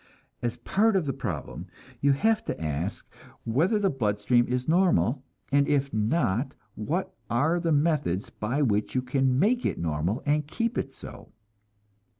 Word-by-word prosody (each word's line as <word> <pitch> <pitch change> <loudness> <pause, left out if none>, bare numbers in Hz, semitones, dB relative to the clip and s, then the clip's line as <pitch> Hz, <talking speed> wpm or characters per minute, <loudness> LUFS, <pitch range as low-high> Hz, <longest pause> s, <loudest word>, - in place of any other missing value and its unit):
As 120 -2 -2
part 210 +2 +2
of 185 -5 +2
the 135 - -1
problem, 105 - -5 0.3
you 140 0 +4
have 220 +9 +2
to - - -4
ask 80 +4 -3 0.4
whether 160 - +2
your 200 -2 +1
blood 105 -6 -1
stream 120 +3 +3
is 125 0 -2
normal, 160 -7 +2 0.3
and 140 0 +3
if 140 -1 +1
not, 115 - 0 0.2
what 155 - -3 0.2
are 155 +9 +2
the 165 -1 0
methods 145 - +1
by 125 +8 -1
which 105 -3 0
you 130 - +1
can 130 0 +1
make 235 - +2
it - - -1
normal 85 - -1
and 150 0 +1
keep 230 +8 -2
it 135 - -2
so? - - -11
135 Hz, 160 wpm, -27 LUFS, 110-165 Hz, 0.4 s, you